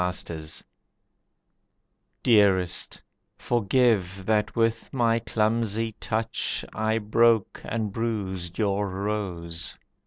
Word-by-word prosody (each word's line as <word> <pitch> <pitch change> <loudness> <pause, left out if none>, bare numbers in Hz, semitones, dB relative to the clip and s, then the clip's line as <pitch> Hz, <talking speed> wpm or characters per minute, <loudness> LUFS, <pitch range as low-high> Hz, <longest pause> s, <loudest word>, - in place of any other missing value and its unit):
Stupidity 80 -3 -5 1.6
Dearest, 95 -6 +3 0.3
forgive 105 -5 +1
that 105 0 +1
with 115 0 0
my 115 -3 +2
clumsy 115 0 0
touch 110 0 -1
I 110 +1 +1
broke 115 0 +3
and 110 -3 -2
bruised 95 -6 -3
your 100 -1 +1
rose. 95 -4 -4
105 Hz, 85 wpm, -26 LUFS, 95-115 Hz, 1.6 s, Dearest